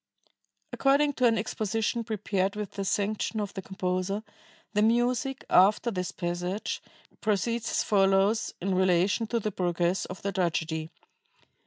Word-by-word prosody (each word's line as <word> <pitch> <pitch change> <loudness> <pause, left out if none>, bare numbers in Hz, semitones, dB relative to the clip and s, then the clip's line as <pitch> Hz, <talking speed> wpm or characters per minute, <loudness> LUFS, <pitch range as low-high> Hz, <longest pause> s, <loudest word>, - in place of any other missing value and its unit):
According 285 +2 +3
to 255 -2 +3
an 225 -1 +3
exposition 220 +2 -1
prepared 200 -3 -1
with 210 -2 -4
the 200 - -4
sanction 210 +3 -1
of 205 -2 -3
the 190 - -5
composer, 185 +2 -2 0.5
the 210 - +2
music, 245 +4 +1
after 205 +6 +4
this 180 -3 -3
passage, 180 +3 -3 0.4
proceeds 220 +2 0
as - - +1
follows 195 +2 +3
in 190 +2 -1
relation 185 +4 +2
to 235 +1 0
the 215 -1 -2
progress 175 0 0
of 185 - -9
the 200 - -1
tragedy 160 -3 -1
200 Hz, 140 wpm, -28 LUFS, 185-225 Hz, 0.5 s, after